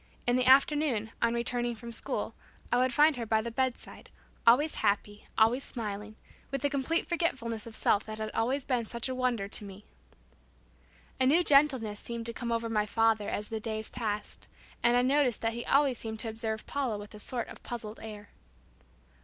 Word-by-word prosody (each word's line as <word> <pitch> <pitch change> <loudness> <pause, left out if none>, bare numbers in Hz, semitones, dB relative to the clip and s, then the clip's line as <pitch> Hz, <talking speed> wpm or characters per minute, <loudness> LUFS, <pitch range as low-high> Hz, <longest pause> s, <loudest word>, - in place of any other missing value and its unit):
In 245 - +3
the 255 0 +2
afternoon, 265 -4 +4
on 230 0 +2
returning 240 0 -1
from 235 +1 -8
school, - - -2 0.4
I 245 - +4
would 255 0 +3
find 295 +2 +4
her 235 - -3
by 220 0 +2
the 235 - -4
bedside, 260 +1 -3 0.4
always 285 +7 +5
happy, 205 +1 -1
always 235 +5 +4
smiling, 215 -2 -5 0.3
with 275 -1 -3
the 285 - +1
complete 280 +5 0
forgetfulness 235 -11 -1
of 225 - -8
self 205 - +2
that 215 0 -6
had 215 0 -4
always 255 +4 0
been 245 -4 0
such 235 +2 -4
a - - -1
wonder 250 -5 0
to 210 - -2
me. 200 0 -10 1.3
A 260 - +4
new 325 +6 +5
gentleness 270 -9 +4
seemed 235 -1 -5
to 235 - +1
come 235 0 -4
over 230 0 0
my 210 -2 0
father 225 -1 +2
as 210 - -3
the 220 - -3
days 220 0 -3
passed, 215 -4 -3 0.3
and 240 +1 +4
I 245 - +4
noticed 265 -3 +2
that 225 0 0
he 235 +1 -5
always 275 -3 +3
seemed 220 -1 -5
to 225 - -2
observe 220 -1 -4
Paula 260 -7 -2
with 205 +1 -10
a 210 - -10
sort 240 +2 -3
of - - -11
puzzled 225 -2 -6
air. 210 -2 -9
235 Hz, 195 wpm, -30 LUFS, 220-255 Hz, 1.3 s, always